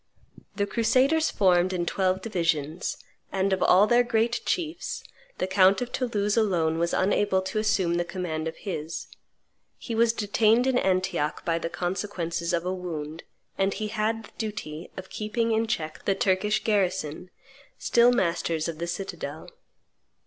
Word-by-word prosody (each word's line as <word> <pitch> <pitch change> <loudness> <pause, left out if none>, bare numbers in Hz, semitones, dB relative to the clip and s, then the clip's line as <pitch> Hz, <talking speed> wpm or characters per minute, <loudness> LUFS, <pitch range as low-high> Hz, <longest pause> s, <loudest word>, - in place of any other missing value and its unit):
The 200 - +1
crusaders 255 +9 +2
formed 185 -1 +3
in 175 -1 -1
twelve 185 +1 0
divisions; 165 -5 -1 0.3
and, 195 0 +1
of 190 - -1
all 190 +3 +6
their 240 +3 +4
great 235 0 +1
chiefs, 335 -1 -2 0.3
the - - 0
count 190 +1 +4
of 245 -1 -4
Toulouse 210 -5 0
alone 170 -8 +1
was 170 0 +1
unable 195 0 +2
to 190 +3 -2
assume 195 -5 +1
the 175 0 +1
command 170 -3 -4
of 160 - -5
his; 165 -4 -5 0.7
he 235 - -6
was 230 0 +4
detained 225 +2 +2
in 260 -1 +2
Antioch 185 -5 0
by 165 -1 +1
the 165 - -3
consequences 175 -2 -3
of 170 0 0
a 185 - -1
wound, 165 -4 -5 0.4
and 195 0 +1
he 215 -1 -3
had 220 +1 -1
the - - -14
duty 180 -7 -5
of 190 0 -8
keeping 225 +2 -1
in 225 +1 +1
check 155 -7 -3
the 195 - +2
Turkish 200 +3 +1
garrison, 185 -5 0 0.5
still 240 +1 +4
masters 170 -7 0
of 165 -2 -5
the 170 - -2
citadel. 195 - -5
190 Hz, 155 wpm, -26 LUFS, 170-220 Hz, 0.7 s, all